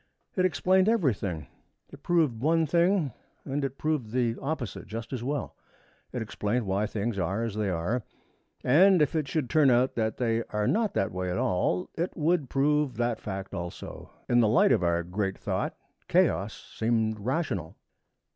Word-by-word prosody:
It 185 - +2
explained 185 +2 +3
everything. 105 - 0 0.5
It 140 - -12
proved 155 -10 +2
one 160 +3 +3
thing 170 - +2 0.3
and 145 +1 -2
it 135 0 -3
proved 150 -8 -1
the 120 -1 0
opposite 135 -8 -4
just 115 +3 -6
as 120 -2 -3
well. 140 +1 -3 0.6
It 120 - -3
explained 110 +2 -2
why 100 +2 0
things 105 -1 -2
are 95 +6 -1
as 115 -3 -2
they 105 -1 -1
are, 90 +8 -1 0.6
and 180 +8 +6
if 150 - -1
it 155 -3 0
should 145 -1 -1
turn 145 +2 +4
out 125 +1 +3
that 110 -2 -1
they 115 -2 +1
are 105 0 -2
not 215 - +1
that 95 - +1
way 90 0 -3
at 90 - -1
all, 90 -1 0
it 170 +3 -3
would 155 -3 +1
prove 145 -2 +1
that 120 -1 0
fact 95 -1 -5
also. 85 -2 -7 0.2
In 120 - +4
the 115 - +5
light 115 +5 +4
of 115 - +3
our 85 -1 +1
great 95 +2 -2
thought - - -2 0.3
chaos - - +1
seemed 110 -1 +1
rational. 120 - -2
120 Hz, 175 wpm, -28 LUFS, 105-150 Hz, 0.6 s, and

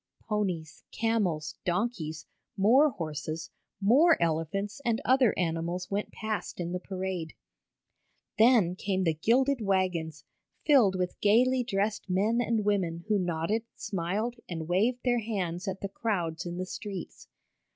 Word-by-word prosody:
Ponies, 185 -8 -2
camels, 210 -9 -1
donkeys, 175 -5 -2 0.3
more 250 +10 +5
horses, 155 - -5 0.3
more 275 - +5
elephants 170 - -1
and 230 -2 +1
other 255 -3 +5
animals 170 +1 -2
went 205 +1 -2
past 215 -3 -4
in 175 -1 -3
the 180 - -2
parade. 185 -4 -4 1.0
Then 220 -7 +5
came 190 0 -1
the 165 -3 +2
gilded 250 - +2
wagons, 180 -6 0 0.4
filled 245 -11 +5
with 180 -1 -3
gaily 250 +5 +4
dressed 205 -3 -1
men 210 +6 +2
and 225 -3 0
women 175 -5 0
who 210 -2 +3
nodded, 175 +4 0
smiled 205 +5 -2
and 165 -3 -4
waved 220 +8 +1
their 245 -1 +3
hands 190 -6 -3
at 190 0 -3
the 200 - -3
crowds 180 -6 -2
in 175 0 -5
the 185 - -2
streets. 195 0 -7
195 Hz, 135 wpm, -29 LUFS, 170-225 Hz, 1.0 s, more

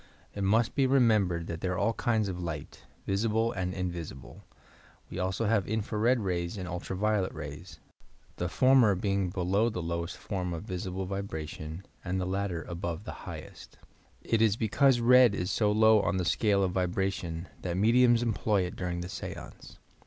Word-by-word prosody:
It 100 - -5
must 110 +4 +2
be 135 -1 +2
remembered 110 -10 +3
that 85 -1 -6
there 90 -1 -1
are - - -3
all 115 +5 +1
kinds 110 -3 0
of 90 -2 -4
light, 80 -4 -6 0.2
visible 110 +3 +1
and 90 -4 -2
invisible. 85 -8 -6 0.7
We - - -5
also 95 +4 -1
have 105 -3 +1
infra 110 0 -2
red 120 +2 +3
rays 90 0 -2
and 90 -2 -5
ultra 90 +2 -4
violet 105 -1 +1
rays,— 80 +4 -8 0.6
the 90 - -2
former 130 -3 +5
being 100 0 0
below 95 +5 +1
the 105 - -4
lowest 85 +1 -3
form 90 -3 -3
of 85 - -5
visible 95 -1 -4
vibration, 80 -3 -5 0.2
and 95 +1 -2
the 90 - -1
latter 95 -2 -2
above 85 -1 -5
the - - -9
high - - -5
est. - - -14 0.5
It 115 -1 +1
is 110 -2 +4
because 120 +4 +3
red 125 -2 +6
is 90 +2 -2
so 105 -2 +2
low 110 0 +5
in 95 - 0
the 90 - -1
scale 100 +3 +2
of 95 - +1
vibration 90 -2 -2
that 90 -1 -2
mediums 120 +3 +4
employ 110 -3 +1
it 90 +4 -5
during 90 -2 -3
the 90 - -5
seance. - - -8
95 Hz, 180 wpm, -29 LUFS, 90-110 Hz, 0.7 s, red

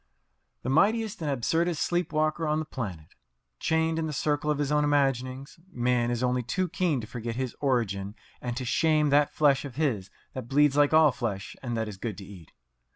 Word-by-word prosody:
The 130 - -2
mightiest 215 +6 +2
and 155 - -1
absurdest 160 +6 0
sleep 175 -1 -1
walker 155 +1 0
on 150 0 +1
the 155 - -2
planet! 95 - -6 0.5
Chained 160 0 +1
in 160 - -1
the 155 - -4
circle 145 +1 0
of 150 - +1
his 145 -1 -1
own 150 0 +3
imaginings, 135 -1 0
man 120 -2 +1
is 120 0 -1
only 125 0 +1
too 180 +10 -1
keen 170 -6 0
to - - -7
forget 115 0 -5
his 130 -1 -3
origin 105 -7 -1 0.3
and 120 -1 -4
to 130 - -3
shame 155 +2 +2
that 145 0 +4
flesh 145 -3 +3
of 135 -4 -8
his 125 -11 -1 0.2
that 130 -3 -6
bleeds 145 +1 +3
like 145 0 +4
all 155 -2 +6
flesh 115 -6 -4
and 120 -3 -3
that 110 -1 -1
is 105 -3 -7
good 105 -2 -5
to 100 - -9
eat. 90 -5 -13
135 Hz, 205 wpm, -27 LUFS, 120-155 Hz, 0.5 s, all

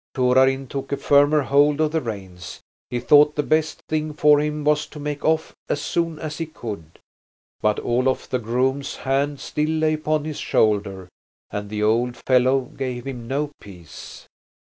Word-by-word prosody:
Torarin 130 +1 +3
took 135 +1 -6
a 140 - 0
firmer 145 +1 +4
hold 145 +2 +3
of 155 -1 +2
the 160 0 0
reins. 95 -6 -7 0.3
He 120 - -2
thought 150 +4 +5
the 150 - 0
best 155 +1 0
thing 155 -1 -2
for 150 0 +5
him 150 0 -2
was 150 0 +1
to 150 - -11
make 145 0 -4
off 160 0 0
as - - 0
soon 165 0 -2
as 155 0 -6
he 165 - -3
could. 100 - -8 0.6
But 105 0 +1
Olof 130 +2 0
the 130 - -1
groom's 130 +4 -1
hand 140 +1 -1
still 150 +1 -2
lay 155 0 +1
upon 155 -1 -1
his 155 -2 -5
shoulder, 100 -3 0 0.4
and 105 0 -5
the 105 0 -2
old 120 +3 +1
fellow 130 +1 +3
gave 125 -1 -6
him 125 -4 -6
no 145 +3 -2
peace. 90 -6 -12
135 Hz, 170 wpm, -22 LUFS, 120-150 Hz, 0.6 s, thought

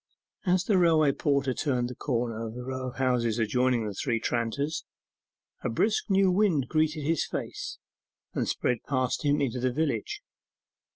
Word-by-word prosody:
As 180 0 +3
the 195 -2 +3
railway 160 -4 +5
porter 140 -2 +1
turned 125 -3 0
the 125 - -6
corner 115 -3 -2
of 110 - -8
the 125 - -6
row 130 0 -4
of 125 - -7
houses 125 -4 +1
adjoining 120 +1 +2
the 105 - -3
Three 115 +3 -1
Tranters, 120 +7 -1 0.8
a - - 0
brisk 210 - +1
new 195 -1 +4
wind 180 -8 +3
greeted 155 -1 +1
his 160 +1 +1
face, - - -5 0.6
and - - -1
spread 125 -2 0
past 130 0 0
him 145 0 +3
into 130 -3 -1
the 130 +1 +1
village. 160 - -2
130 Hz, 165 wpm, -28 LUFS, 120-155 Hz, 0.8 s, railway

